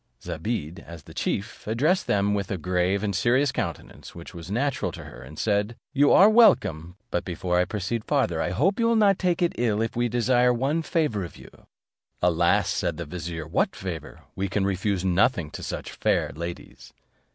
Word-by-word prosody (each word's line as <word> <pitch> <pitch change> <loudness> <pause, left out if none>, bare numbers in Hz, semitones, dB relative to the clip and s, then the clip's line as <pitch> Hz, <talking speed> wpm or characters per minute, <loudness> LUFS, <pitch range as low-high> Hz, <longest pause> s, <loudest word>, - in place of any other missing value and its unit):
Zobeide, 85 -1 -4
as 85 -5 -11
the - - -13
chief, 105 +2 -3
addressed 150 - +1
them 100 0 +2
with 100 -1 -2
a 95 - -2
grave 90 +4 0
and 100 -2 -1
serious 125 +9 +2
countenance, - - -6
which 85 +4 -10
was 85 0 -9
natural 135 +6 -1
to - - -8
her, - - -11
and 70 +5 -12
said, 105 +1 0 0.2
"You 145 0 +4
are 195 - +8
welcome. 175 - +4 0.2
But 90 - 0
before 90 0 -1
I 90 - +3
proceed 105 +3 -3
farther, 110 - +1
I - - 0
hope 155 - +1
you 230 - +3
will 230 - +3
not 205 -3 +4
take 180 -1 +1
it 170 - +1
ill 110 -3 +1
if 115 0 -2
we 120 0 +1
desire 125 +1 +3
one 135 +7 0
favour 150 - 0
of 85 - -9
you." - - -13 0.7
"Alas!" - - +3
said 85 -3 -1
the 85 - -5
vizier, 80 0 -5
"what 80 - 0
favour? - - -7
We 95 +1 -2
can 95 +1 0
refuse 95 -1 -1
nothing 90 - +2
to - - -7
such - - -5
fair - - 0
ladies." 85 +3 -8
105 Hz, 195 wpm, -25 LUFS, 90-130 Hz, 0.7 s, are